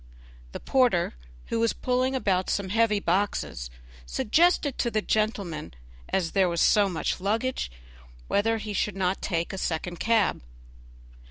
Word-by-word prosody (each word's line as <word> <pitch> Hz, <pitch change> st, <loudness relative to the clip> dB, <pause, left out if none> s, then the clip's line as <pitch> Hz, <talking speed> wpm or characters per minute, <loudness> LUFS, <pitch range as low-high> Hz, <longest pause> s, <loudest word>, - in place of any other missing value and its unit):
The -, -, -6 dB
porter, 245 Hz, -10 st, +2 dB, 0.4 s
who 230 Hz, -, 0 dB
was 230 Hz, 0 st, +2 dB
pulling 255 Hz, +1 st, 0 dB
about 190 Hz, -7 st, 0 dB
some 200 Hz, -2 st, -1 dB
heavy 215 Hz, 0 st, +2 dB
boxes, 175 Hz, -, -1 dB, 0.3 s
suggested 285 Hz, -, +2 dB
to 240 Hz, -, +1 dB
the 215 Hz, -2 st, -1 dB
gentleman, 200 Hz, -, -1 dB, 0.3 s
as 175 Hz, -4 st, 0 dB
there 190 Hz, -2 st, +3 dB
was 170 Hz, -1 st, -1 dB
so 205 Hz, +3 st, +4 dB
much 175 Hz, +1 st, -2 dB
luggage, 225 Hz, -, -1 dB, 0.6 s
whether 225 Hz, +3 st, +1 dB
he 215 Hz, -1 st, -5 dB
would 210 Hz, -, -8 dB
not 190 Hz, 0 st, -1 dB
take 170 Hz, -2 st, -2 dB
a 190 Hz, -, -4 dB
second 175 Hz, +1 st, -3 dB
cab. 225 Hz, -2 st, +2 dB
205 Hz, 145 wpm, -26 LUFS, 180-230 Hz, 0.6 s, so